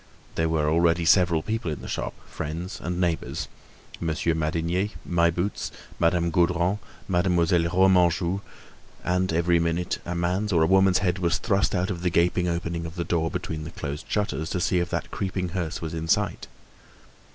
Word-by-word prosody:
There 80 Hz, 0 st, 0 dB
were 80 Hz, -2 st, +1 dB
already 85 Hz, +1 st, +3 dB
several 85 Hz, -2 st, +4 dB
people 110 Hz, -6 st, -2 dB
in 75 Hz, -, -4 dB
the -, -, -6 dB
shop, -, -, -3 dB
friends 80 Hz, +4 st, -5 dB
and 90 Hz, +1 st, -3 dB
neighbors—Monsieur 85 Hz, -1 st, -3 dB
Madinier, 85 Hz, +5 st, 0 dB, 0.2 s
My 85 Hz, -1 st, +3 dB
Boots, 90 Hz, +5 st, -2 dB, 0.3 s
Madame 85 Hz, 0 st, +2 dB
Gaudron, 90 Hz, +3 st, +2 dB, 0.3 s
Mademoiselle 90 Hz, -2 st, +2 dB
Remanjou; 90 Hz, 0 st, +3 dB, 0.6 s
and 90 Hz, 0 st, +1 dB
every 85 Hz, +1 st, +3 dB
minute, 85 Hz, +1 st, -1 dB
a 90 Hz, -, -4 dB
man's 90 Hz, +5 st, 0 dB
or 85 Hz, -3 st, +4 dB
a -, -, +5 dB
woman's 95 Hz, +1 st, +5 dB
head 90 Hz, +1 st, +1 dB
was 85 Hz, -2 st, +1 dB
thrust 100 Hz, -2 st, +1 dB
out 90 Hz, +2 st, 0 dB
of 85 Hz, -2 st, -4 dB
the 90 Hz, -, +1 dB
gaping 90 Hz, +1 st, +2 dB
opening 85 Hz, -1 st, -2 dB
of 80 Hz, -, -9 dB
the 85 Hz, -, -2 dB
door 80 Hz, -1 st, 0 dB
between 80 Hz, -3 st, -4 dB
the 75 Hz, -, -6 dB
closed 75 Hz, -3 st, -6 dB
shutters, 100 Hz, -6 st, -1 dB
to 90 Hz, -, -1 dB
see 90 Hz, 0 st, +2 dB
if 85 Hz, 0 st, -1 dB
that -, -, -3 dB
creeping 95 Hz, -2 st, -2 dB
hearse 85 Hz, -2 st, -3 dB
was 80 Hz, -, -4 dB
in 80 Hz, 0 st, -4 dB
sight. -, -, 0 dB
85 Hz, 175 wpm, -25 LUFS, 85-90 Hz, 0.6 s, a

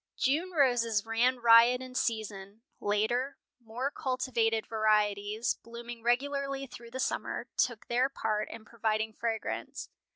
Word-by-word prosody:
June 310 Hz, +8 st, +1 dB
roses 245 Hz, -, +2 dB
ran 235 Hz, +3 st, +2 dB
riot 235 Hz, +1 st, +7 dB
in 255 Hz, 0 st, -9 dB
season. 215 Hz, -3 st, -3 dB, 0.2 s
Later, 240 Hz, +7 st, 0 dB, 0.3 s
more 245 Hz, +5 st, -3 dB
cultivated 235 Hz, -5 st, 0 dB
varieties, 215 Hz, 0 st, +1 dB
blooming 235 Hz, 0 st, -9 dB
regularly 275 Hz, +3 st, 0 dB
through 235 Hz, -2 st, -11 dB
the 260 Hz, +2 st, -6 dB
summer, -, -, -2 dB
took 240 Hz, -4 st, 0 dB
their 250 Hz, +3 st, +1 dB
part 215 Hz, -5 st, -2 dB
in 225 Hz, -1 st, -9 dB
providing 220 Hz, -1 st, -1 dB
fragrance. 225 Hz, 0 st, -4 dB
235 Hz, 125 wpm, -30 LUFS, 220-255 Hz, 0.3 s, riot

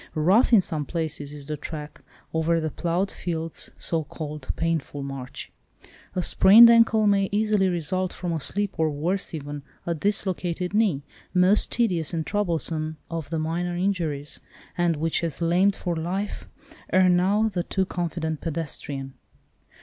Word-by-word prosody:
Rough 185 Hz, +12 st, +4 dB
in 225 Hz, -5 st, +7 dB
some 155 Hz, -4 st, -1 dB
places 155 Hz, -2 st, -3 dB
is 145 Hz, -1 st, -9 dB
the 150 Hz, +1 st, -3 dB
track—over 160 Hz, +2 st, -4 dB
the 155 Hz, -1 st, -2 dB
ploughed 175 Hz, +5 st, -1 dB
field's 165 Hz, -2 st, -3 dB
(so 165 Hz, -2 st, 0 dB
called) 150 Hz, -2 st, -7 dB
painful 160 Hz, -4 st, -2 dB
march. 135 Hz, -2 st, -7 dB, 0.6 s
A 180 Hz, -, 0 dB
sprained 225 Hz, +7 st, +8 dB
ankle 225 Hz, -2 st, +5 dB
may 200 Hz, -1 st, +3 dB
easily 210 Hz, -2 st, +2 dB
result, 180 Hz, +2 st, -1 dB
from 175 Hz, -2 st, -4 dB
a 160 Hz, -, -1 dB
slip, 200 Hz, +4 st, -2 dB
or 160 Hz, -1 st, +3 dB
worse 170 Hz, +7 st, -2 dB
even, 145 Hz, -1 st, -6 dB, 0.2 s
a 170 Hz, -, 0 dB
dislocated 180 Hz, -1 st, -1 dB
knee, 205 Hz, -10 st, +2 dB, 0.3 s
most 185 Hz, +3 st, +4 dB
tedious 180 Hz, -9 st, +1 dB
and 160 Hz, -1 st, -2 dB
troublesome 165 Hz, -5 st, -1 dB
of 165 Hz, -3 st, -4 dB
the 165 Hz, -, -2 dB
minor 170 Hz, +3 st, -2 dB
injuries, 165 Hz, -7 st, -1 dB, 0.4 s
and 175 Hz, -2 st, +1 dB
which 160 Hz, +2 st, 0 dB
has 165 Hz, -3 st, -2 dB
lamed 180 Hz, +4 st, +3 dB
for 175 Hz, -2 st, -3 dB
life 185 Hz, +5 st, -4 dB, 0.4 s
ere 185 Hz, 0 st, +5 dB
now 190 Hz, +5 st, +3 dB
the 195 Hz, -5 st, -2 dB
too 190 Hz, +2 st, -1 dB
confident 165 Hz, -3 st, -3 dB
pedestrian. 145 Hz, -4 st, -4 dB
170 Hz, 150 wpm, -25 LUFS, 155-190 Hz, 0.6 s, sprained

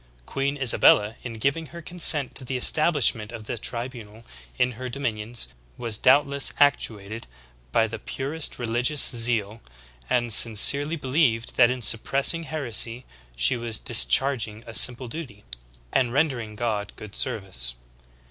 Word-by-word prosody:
Queen 140 Hz, +1 st, -4 dB
Isabella, 115 Hz, -4 st, +3 dB
in 120 Hz, -, -8 dB
giving 140 Hz, +8 st, -3 dB
her 170 Hz, +4 st, -12 dB
consent 155 Hz, -5 st, +2 dB
to -, -, +1 dB
the 130 Hz, +1 st, -5 dB
estab 155 Hz, +6 st, +4 dB
lishment 115 Hz, -6 st, +1 dB
of 115 Hz, -, -10 dB
the -, -, -5 dB
tribunal 115 Hz, -2 st, -7 dB, 0.3 s
in 125 Hz, -, 0 dB
her 130 Hz, +2 st, -8 dB
dominions, 115 Hz, -, -5 dB, 0.3 s
was 115 Hz, -3 st, -3 dB
doubtless 140 Hz, +1 st, +2 dB
ac 145 Hz, 0 st, +5 dB
tuated 110 Hz, +1 st, -6 dB, 0.5 s
by 110 Hz, -, +1 dB
the 115 Hz, -, -8 dB
purest 145 Hz, +4 st, -5 dB
religious 120 Hz, +4 st, +2 dB
zeal, 115 Hz, -2 st, 0 dB, 0.5 s
and 120 Hz, -2 st, +1 dB
sincerely 140 Hz, +9 st, +5 dB
believed 130 Hz, -5 st, -2 dB
that 120 Hz, -2 st, +4 dB
in 125 Hz, -1 st, -5 dB
suppressing 140 Hz, +9 st, +2 dB
heresy 125 Hz, -5 st, -1 dB, 0.3 s
she -, -, +1 dB
was 115 Hz, -2 st, -3 dB
discharging 110 Hz, -, +2 dB
a 115 Hz, -, -11 dB
simple 125 Hz, +3 st, +5 dB
duty, 120 Hz, -6 st, -10 dB, 0.5 s
and 125 Hz, -3 st, 0 dB
rendering 130 Hz, -7 st, -2 dB
God 105 Hz, -3 st, -5 dB
good 105 Hz, -2 st, -12 dB
service. 95 Hz, -, -3 dB
120 Hz, 140 wpm, -23 LUFS, 110-140 Hz, 0.5 s, ac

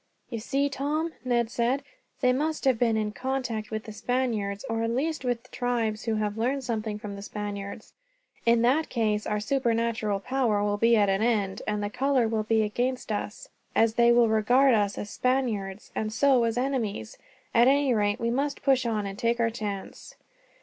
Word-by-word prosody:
"You 230 Hz, -, -3 dB
see, 275 Hz, +5 st, 0 dB
Tom," 295 Hz, +4 st, -2 dB
Ned 240 Hz, -2 st, +1 dB
said, 245 Hz, +4 st, 0 dB, 0.4 s
"they 250 Hz, -1 st, +4 dB
must 305 Hz, +3 st, -1 dB
have 260 Hz, -4 st, +3 dB
been 230 Hz, -2 st, +2 dB
in 215 Hz, -1 st, -1 dB
contact 240 Hz, -1 st, -3 dB
with 220 Hz, -1 st, -4 dB
the 220 Hz, -, -8 dB
Spaniards, 215 Hz, -4 st, -2 dB
or 225 Hz, 0 st, -1 dB
at 230 Hz, -, 0 dB
least 290 Hz, +5 st, -1 dB
with 245 Hz, 0 st, -3 dB
tribes 230 Hz, -3 st, -1 dB
who 225 Hz, -2 st, 0 dB
have 210 Hz, 0 st, -2 dB
learned 265 Hz, +4 st, 0 dB
something 220 Hz, -3 st, -2 dB
from 210 Hz, -1 st, -7 dB
the 200 Hz, -, -8 dB
Spaniards. 205 Hz, 0 st, -6 dB, 0.5 s
In 235 Hz, 0 st, +4 dB
that 280 Hz, +7 st, +2 dB
case 215 Hz, -3 st, 0 dB
our 210 Hz, 0 st, 0 dB
supernatural 230 Hz, -3 st, 0 dB
power 230 Hz, -3 st, 0 dB
will 205 Hz, 0 st, 0 dB
be 230 Hz, +2 st, +4 dB
at 205 Hz, -2 st, +4 dB
an 195 Hz, +1 st, +1 dB
end, 210 Hz, -4 st, 0 dB
and 210 Hz, -1 st, -1 dB
our 205 Hz, -, -1 dB
color 265 Hz, -1 st, +2 dB
will 220 Hz, -1 st, 0 dB
be 220 Hz, 0 st, +2 dB
against 245 Hz, +3 st, -2 dB
us, 210 Hz, 0 st, -4 dB, 0.3 s
as 225 Hz, -1 st, +4 dB
they 235 Hz, +1 st, +5 dB
will 235 Hz, -1 st, +5 dB
regard 245 Hz, +5 st, +4 dB
us 205 Hz, -2 st, +1 dB
as 205 Hz, -, -5 dB
Spaniards, 225 Hz, -7 st, -1 dB
and 215 Hz, 0 st, -2 dB
so 255 Hz, +1 st, +3 dB
as 230 Hz, 0 st, -1 dB
enemies. 235 Hz, -, -2 dB, 0.3 s
At 235 Hz, +1 st, +5 dB
any 275 Hz, -1 st, +4 dB
rate, 205 Hz, -2 st, +1 dB
we 235 Hz, 0 st, 0 dB
must 280 Hz, +3 st, -2 dB
push 260 Hz, -3 st, +3 dB
on 215 Hz, -3 st, -1 dB
and 195 Hz, 0 st, -6 dB
take 235 Hz, +1 st, +1 dB
our 230 Hz, -1 st, +2 dB
chance." 205 Hz, -4 st, -6 dB
230 Hz, 190 wpm, -27 LUFS, 210-255 Hz, 0.5 s, they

